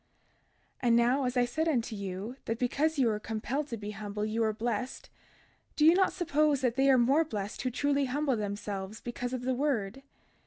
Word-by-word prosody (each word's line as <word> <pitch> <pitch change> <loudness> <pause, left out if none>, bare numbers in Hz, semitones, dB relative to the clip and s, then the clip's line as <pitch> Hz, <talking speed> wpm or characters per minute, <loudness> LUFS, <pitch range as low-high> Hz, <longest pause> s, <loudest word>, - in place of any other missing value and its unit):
32:14 245 - 0
And 230 - +5
now, 245 +4 +3
as 250 0 -1
I 245 - +4
said 315 +6 -1
unto 240 -7 0
you, 200 +4 -5
that 225 - -2
because 295 +6 0
ye 265 - +3
were 215 -2 +1
compelled 230 +7 -3
to 235 -5 -5
be 205 0 -6
humble 210 0 -4
ye 215 +1 -2
were 220 -1 +2
blessed, 235 +2 -4 0.6
do 300 - +3
ye 325 - +8
not 380 +1 +3
suppose 305 -5 +1
that 245 -3 +1
they 270 +1 +3
are 265 - +6
more 270 +7 +4
blessed 210 -9 -5
who 255 - 0
truly 280 +2 +1
humble 275 +1 0
themselves 205 -1 -4
because 245 +1 -5
of 255 -1 -4
the 260 +1 0
word? 255 -4 -1
245 Hz, 205 wpm, -30 LUFS, 215-280 Hz, 0.6 s, ye